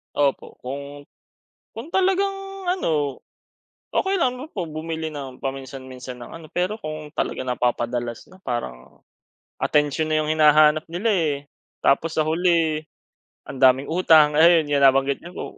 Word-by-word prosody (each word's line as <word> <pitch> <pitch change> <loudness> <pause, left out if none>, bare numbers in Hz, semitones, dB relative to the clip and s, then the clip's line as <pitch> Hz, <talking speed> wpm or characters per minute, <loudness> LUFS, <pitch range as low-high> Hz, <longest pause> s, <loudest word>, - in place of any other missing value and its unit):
Opo, 140 -2 0
kung 140 +2 -7 0.7
kung 230 +8 -8
talagang 385 +1 +2 0.3
ano, 150 - 0 0.7
okey 385 +1 +1
lang 255 -8 0 0.2
po 180 - -2
bumili 160 0 -4
ng 135 -3 -8
paminsan-minsan 130 -2 -7
ng - - -10
ano, 165 -1 -10
pero 185 +5 -1
kung 155 -1 -7
talagang 130 -5 -3
napapadalas 120 -1 -2
na 185 - -17
parang 65 - -6 0.6
atensyon 150 +1 +1
na 155 - +2
yung 155 +1 -1
hinahanap 155 0 +5
nila, 200 +7 0
eh. 160 -6 +1 0.5
Tapos 160 +4 +2
sa 155 - +2
huli 165 -2 +1 0.6
ang 135 - -8
daming 130 +3 +4
utang, 155 -4 +5
ayun 165 -2 +5
yung 140 -1 +2
nabanggit 135 +1 +4
niyo 175 +1 -11
po. - - -4
155 Hz, 140 wpm, -23 LUFS, 135-165 Hz, 0.7 s, hinahanap